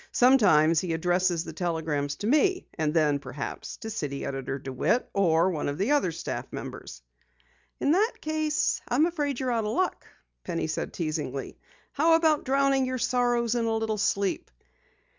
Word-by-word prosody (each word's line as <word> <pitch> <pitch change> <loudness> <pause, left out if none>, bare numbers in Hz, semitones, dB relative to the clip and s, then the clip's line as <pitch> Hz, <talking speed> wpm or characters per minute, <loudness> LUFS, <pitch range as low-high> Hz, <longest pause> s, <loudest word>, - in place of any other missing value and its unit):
Sometimes 185 - +5
he 175 -1 -2
addresses 175 0 +1
the - - -8
telegrams 155 -4 -2
to - - -6
me, 365 - +2
and 155 -2 -1
then 150 -3 +2
perhaps 140 0 -6
to 225 - -7
City 145 -9 -4
Editor 135 0 -3
DeWitt 135 - -1
or 175 -2 +3
one 150 -4 -2
of 145 - -4
the 200 - 0
other 285 - +2
staff - - -5
members." 60 - -8 0.8
"In 285 - +2
that 420 +8 +3
case, 310 -1 0
I'm 275 +6 +3
afraid 295 -6 -2
you're 255 -1 -1
out 230 -2 0
of 210 +1 -2
luck," 370 +8 -1 0.4
Penny 170 -2 -2
said 155 - -3
teasingly. 155 -3 -4 0.3
"How 325 +3 +4
about 320 -2 +2
drowning 275 0 +2
your 255 0 -2
troubles 240 -2 +1
in 235 -1 0
a 225 0 0
little 220 -1 -2
sleep?" 200 -1 0
210 Hz, 165 wpm, -27 LUFS, 160-270 Hz, 0.8 s, Sometimes